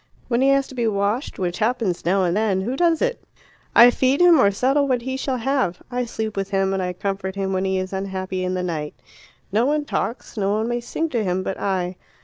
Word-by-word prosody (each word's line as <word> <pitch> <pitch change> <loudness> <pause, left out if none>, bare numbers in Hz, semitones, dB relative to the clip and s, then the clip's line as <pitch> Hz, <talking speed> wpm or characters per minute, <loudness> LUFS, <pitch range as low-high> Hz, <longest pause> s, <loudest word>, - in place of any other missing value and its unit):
When 240 0 +1
he 270 - +4
has 275 0 +3
to - - -12
be 240 -3 0
washed, 205 +5 -1
which 180 -2 -2
happens 220 -5 0
now 190 +2 +2
and 175 0 +1
then, 205 -3 +1
who 240 +7 -2
does 335 - +2
it? - - -1 0.5
I. 235 - +10
I 245 - +7
feed 260 +3 +1
him, 350 -3 +6
or 200 - +5
settle 270 +8 +1
what 250 -3 0
he 260 +1 -3
shall 265 -1 -2
have. 250 -7 -1
I 250 0 -1
sleep 220 -2 -4
with 195 -1 -2
him 195 -1 +1
and 180 -2 -3
comfort 195 -1 -3
him 195 -1 -2
when 190 0 0
he 190 0 0
is 185 +1 -3
unhappy 190 -1 -3
in 185 0 -1
the 180 - -2
night. 155 -4 -4 0.6
No 225 +6 +2
one 295 0 0
talks, 240 -4 -3
no 200 -1 +1
one 220 +2 0
may 240 0 -1
sing 320 +7 -3
to 235 -6 -1
him 185 -1 -1
but 190 - -4
I. 185 -2 -1
205 Hz, 240 wpm, -22 LUFS, 190-255 Hz, 0.6 s, I